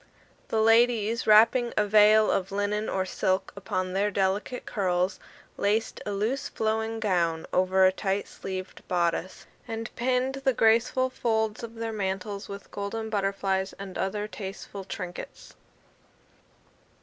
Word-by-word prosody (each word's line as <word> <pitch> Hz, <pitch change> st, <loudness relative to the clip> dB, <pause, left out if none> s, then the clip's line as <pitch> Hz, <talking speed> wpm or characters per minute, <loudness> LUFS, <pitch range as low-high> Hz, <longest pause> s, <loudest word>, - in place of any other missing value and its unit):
The 220 Hz, -1 st, +1 dB
ladies, 230 Hz, 0 st, +3 dB
wrapping 230 Hz, +3 st, +5 dB
a 210 Hz, -, +4 dB
veil 215 Hz, +1 st, +6 dB
of 190 Hz, 0 st, -1 dB
linen 205 Hz, +2 st, -1 dB
or 190 Hz, -1 st, 0 dB
silk 190 Hz, +1 st, -1 dB
upon 185 Hz, -2 st, -3 dB
their 200 Hz, +2 st, +1 dB
delicate 200 Hz, +5 st, -1 dB
curls, 185 Hz, -2 st, 0 dB, 0.4 s
laced 215 Hz, +3 st, 0 dB
a -, -, -1 dB
loose 220 Hz, +8 st, -1 dB
flowing 220 Hz, 0 st, -1 dB
gown 170 Hz, -6 st, 0 dB
over 185 Hz, +1 st, +4 dB
a 185 Hz, -, +6 dB
tight 195 Hz, +1 st, -2 dB
sleeved 185 Hz, -1 st, -7 dB
bodice, 175 Hz, 0 st, -1 dB, 0.2 s
and 225 Hz, -1 st, -5 dB
pinned 255 Hz, +2 st, 0 dB
the 265 Hz, -1 st, +3 dB
graceful 235 Hz, +3 st, +3 dB
folds 220 Hz, -3 st, -1 dB
of 230 Hz, -1 st, -8 dB
their 225 Hz, 0 st, -4 dB
mantles 200 Hz, 0 st, -3 dB
with 200 Hz, 0 st, -9 dB
golden 220 Hz, +2 st, -4 dB
butterflies 195 Hz, -1 st, -1 dB
and 195 Hz, -2 st, -9 dB
other 205 Hz, +2 st, -2 dB
tasteful 195 Hz, -1 st, -7 dB
trinkets. 180 Hz, -2 st, -7 dB
205 Hz, 135 wpm, -27 LUFS, 190-225 Hz, 0.4 s, veil